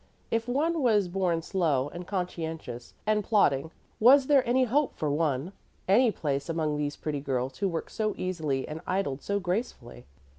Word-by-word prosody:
If 230 +1 0
one 310 +6 +1
was 215 -7 +3
born 175 -2 0
slow 160 -9 +1
and 175 +2 -8
conscientious 160 - -5
and 215 -1 +2
plodding, 160 -9 +2 0.3
was 260 +4 +7
there 275 -2 +4
any 255 +2 +3
hope 275 +4 +1
for 150 -2 -1
one, 150 +2 -1 0.3
any 230 +6 +5
place 140 -5 -2
among 160 -2 0
these 145 0 -2
pretty 150 -2 -3
girls 130 -1 -2
who 195 -1 +1
worked 165 -2 -4
so 215 -1 -1
easily 155 -8 -2
and 155 +1 -6
idled 185 -8 -1
so 200 0 -1
gracefully? 180 - -4
175 Hz, 170 wpm, -28 LUFS, 145-215 Hz, 0.3 s, was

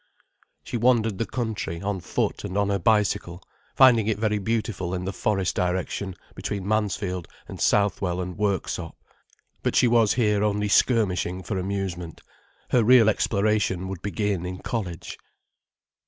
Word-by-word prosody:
She - - -4
wandered 115 -4 +2
the 115 - -1
country, 110 -9 -3
on 100 0 -2
foot - - -2
and 95 - -4
on 100 0 +1
her 100 -1 0
bicycle, 100 -3 +1 0.3
finding 120 -5 +6
it 110 - +1
very 105 -1 0
beautiful 100 -4 -2
in 90 0 -4
the 95 - -3
forest 95 -2 0
direction, 90 +1 -2 0.2
between 100 -2 -4
Mansfield 100 -4 -1 0.2
and - - -8
Southwell 95 -3 +1
and 90 -1 -4
Worksop. 95 -4 -2 0.7
But - - -1
she 125 - +5
was 115 -3 +4
here 105 -4 +2
only 105 0 0
skirmishing 95 -6 +2
for 95 -1 -3
amusement. 90 -3 -4 0.5
Her 120 - +4
real 120 -1 +6
exploration 105 -3 0
would 95 -3 -6
begin 100 -3 -1
in 90 +1 -6
college. 90 -7 -4
100 Hz, 145 wpm, -25 LUFS, 90-110 Hz, 0.7 s, finding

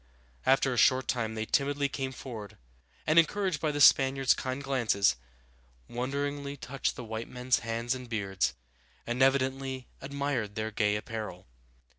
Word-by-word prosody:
After 135 0 +4
a - - -3
short 130 +1 +4
time 110 -3 -1
they 110 0 -2
timidly 140 +3 +1
came 135 -1 -3
forward, 115 -6 -8 0.5
and, 155 +2 +6
encouraged 185 -1 +1
by 155 - +1
the 145 - -3
Spaniards' 135 -1 +6
kind 130 +2 -4
glances, 120 -7 +2 0.7
wonderingly 140 +3 -3
touched 135 0 -2
the 125 - -7
white 110 0 -5
men's 125 0 +1
hands 115 +2 -2
and 125 -2 -7
beards, 100 -4 -1 0.5
and 120 +2 -2
evidently 135 -1 +1
admired 135 -6 -2
their 110 0 -2
gay 105 -1 +1
apparel. 105 -4 -5
130 Hz, 145 wpm, -30 LUFS, 115-140 Hz, 0.7 s, and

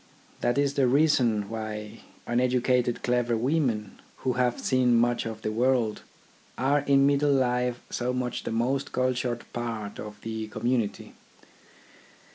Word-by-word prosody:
That 120 - 0
is 140 -1 +2
the 135 -2 +2
reason 125 -7 +3
why 110 -1 -6 0.3
un 120 0 +1
educated 125 -1 +1
clever 120 -1 +1
women, 120 -5 -1 0.3
who 130 - +2
have 125 -1 0
seen 125 -2 +2
much 120 0 +2
of 110 -1 -7
the 110 - -1
world, 120 -1 +1 0.6
are 140 +3 +2
in 140 -1 +3
middle 145 +1 +3
life 125 -2 +1
so 125 +1 -1
much 125 -1 -2
the - - -5
most 125 +4 -1
cultured 125 -1 -1
part 115 -4 -4
of 105 -1 -8
the 110 -1 -4
community. 120 0 -2
125 Hz, 140 wpm, -27 LUFS, 115-130 Hz, 0.6 s, reason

